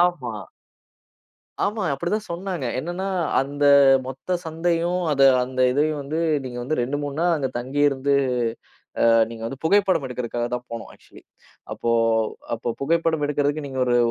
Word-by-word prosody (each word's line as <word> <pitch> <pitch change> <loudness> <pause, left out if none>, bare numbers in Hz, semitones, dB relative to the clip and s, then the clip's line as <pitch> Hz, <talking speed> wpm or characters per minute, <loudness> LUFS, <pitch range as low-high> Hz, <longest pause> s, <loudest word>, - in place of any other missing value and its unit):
ஆமா. 160 -10 +1 1.3
ஆமா. 210 -1 -1
அப்படி 170 +6 -3
தான் 215 0 -3
சொன்னாங்க. 180 -4 -4
என்னன்னா 175 +6 -4 0.3
அந்த 145 +1 -2 0.4
மொத்த 135 +7 -5
சந்தையும், 170 +2 0
அத 140 - +2 0.2
அந்த 130 0 -5
இதையும் 150 +3 +1
வந்து 150 +4 -3 0.3
நீங்க 125 -1 -6
வந்து, 155 +5 -2
2 130 +4 -1
3 145 -1 -4
நாள் 175 0 +3
அங்க 135 -3 -1
தங்கியிருந்து 140 +2 +1 0.9
அ, - - +6 0.2
நீங்க 115 -1 -8
வந்து 135 +3 -6
புகைப்படம் 190 -3 +3
எடுக்கறதுக்காகதான் 120 0 -3
போனோம் 115 -1 -6
ஆக்ச்சுவலி. - - -18 0.5
அப்போ 115 - -2 0.6
அப்போ 115 +1 -5
புகைப்படம் 160 0 +1
எடுக்கறதுக்கு 145 +1 -1
நீங்க 130 -1 -4
ஒரு 120 0 +3
145 Hz, 140 wpm, -23 LUFS, 130-170 Hz, 1.3 s, அ